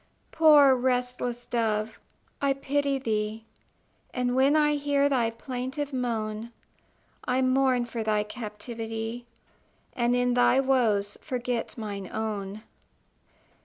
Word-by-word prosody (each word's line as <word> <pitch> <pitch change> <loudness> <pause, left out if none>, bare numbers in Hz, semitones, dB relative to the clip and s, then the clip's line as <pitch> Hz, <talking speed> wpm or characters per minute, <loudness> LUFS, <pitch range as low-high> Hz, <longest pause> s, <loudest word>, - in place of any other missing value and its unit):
Poor 300 -4 +7
restless 250 -1 -1
dove, 220 -2 -1 0.4
I 280 -1 +3
pity 280 0 0
thee; 220 -3 -2 0.7
And 250 -1 0
when 270 +3 +4
I 300 -1 +4
hear 285 -1 +2
thy 250 -5 +1
plaintive 260 +4 -5
moan, 230 -3 -3 0.7
I 255 +1 +1
mourn 255 -1 +2
for 235 -1 -5
thy 215 -1 +1
captivity, 225 +2 -6 0.7
And 240 -1 +2
in 245 0 +2
thy 245 +1 +4
woes 225 -7 +1
forget 245 -4 -3
mine 200 -4 -5
own. 210 -1 -4
245 Hz, 110 wpm, -27 LUFS, 220-265 Hz, 0.7 s, Poor